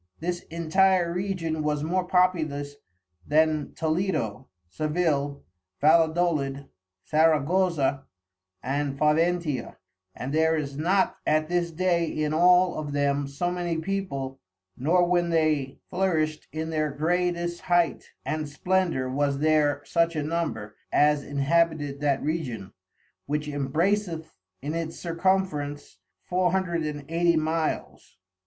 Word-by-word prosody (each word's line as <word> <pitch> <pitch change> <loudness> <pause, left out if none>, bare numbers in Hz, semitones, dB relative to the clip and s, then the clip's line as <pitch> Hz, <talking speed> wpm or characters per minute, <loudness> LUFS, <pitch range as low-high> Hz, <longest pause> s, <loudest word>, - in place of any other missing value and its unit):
This 175 +1 -2
intire 170 +2 +2
Region 175 -4 -2
was 150 -1 -1
more 180 +4 0
populous 155 -6 +1 0.5
then 155 - +1
Toledo, 155 - -1 0.2
Sevil, 145 - -1 0.4
Valedolid, 155 -3 +2 0.4
Saragoza, 155 -2 +2 0.6
and 140 +1 -2
Faventia; 155 -1 +1 0.4
and 130 +3 -5
there 160 +1 +3
is 140 -2 -4
not 180 +6 +1
at 155 +1 +2
this 175 -1 0
day 170 0 +1
in 155 0 -1
all 180 +1 +4
of 150 -2 -5
them 140 0 +1
so 160 +6 -2
many 175 -2 -2
people, 160 -7 -3 0.4
nor 175 +6 +2
when 175 -1 +2
they 155 -5 +1 0.2
flourisht 160 -5 0
in 160 +1 -4
their 155 -1 0
greatest 175 +3 -1
height 175 -1 +1 0.2
and 155 +2 -2
splendor 175 -3 0
was 140 +1 0
there 145 -1 +2
such 170 +1 +1
a 155 - -1
number, 150 -10 -3 0.2
as 150 -1 +3
inhabited 145 0 0
that 145 -2 0
Region, 125 - -3 0.5
which 150 +1 -2
embraceth 160 +5 -1 0.3
in 150 +2 -3
its 165 -1 -4
Circumference, 165 - -1 0.2
four 180 -1 +1
hundred 180 -3 0
and 145 -1 -6
eighty 170 +1 +2
Miles. 160 0 -2
155 Hz, 120 wpm, -26 LUFS, 145-175 Hz, 0.6 s, all